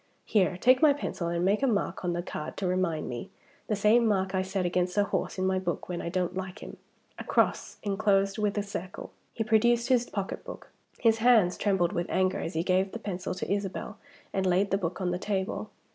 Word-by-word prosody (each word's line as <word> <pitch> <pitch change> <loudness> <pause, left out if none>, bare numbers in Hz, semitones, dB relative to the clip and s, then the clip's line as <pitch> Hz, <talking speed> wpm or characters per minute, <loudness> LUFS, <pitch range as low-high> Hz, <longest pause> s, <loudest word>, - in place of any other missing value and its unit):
Here; 185 -4 +2
take 255 +6 +4
my 305 -2 +7
pencil, 195 -11 -4
and 170 +1 0
make 200 +5 +2
a 275 - +3
mark 205 -5 -1
on 175 -1 0
the 175 0 -2
cards 150 - -6
to 195 - -3
remind 180 -4 0
me; 125 +11 -6 0.4
the 215 - +1
same 220 +3 +4
mark 190 -2 +1
I 190 - +1
set 190 0 -2
against 180 +2 0
a 205 - +5
horse 200 - -2
in 185 - 0
my 190 0 +1
book 175 -3 -3
when 175 -1 -3
I - - -3
don't 180 0 -1
like 190 0 -5
him - - -9 0.4
a - - -4
cross, - - 0
inclosed 200 0 +1
in 210 - +2
a 205 - 0
circle." 185 -2 -7 0.2
He 225 - -2
produced 235 +2 +3
his 245 -2 +3
pocketbook. 195 -1 -6 0.3
His 225 -1 +3
hands 220 -7 +5
trembled 190 -3 +1
with 175 -2 -2
anger 185 0 +1
as 165 - -4
he 165 - +1
gave 190 +1 +1
the - - -3
pencil 190 -4 -4
to 185 - -2
Isabel 200 +2 -4 0.3
and 190 -1 0
laid 185 +2 +2
the 195 - +3
book 175 -2 -3
on 180 -2 0
the 180 - -2
table. 195 +1 -2
190 Hz, 220 wpm, -28 LUFS, 180-210 Hz, 0.4 s, my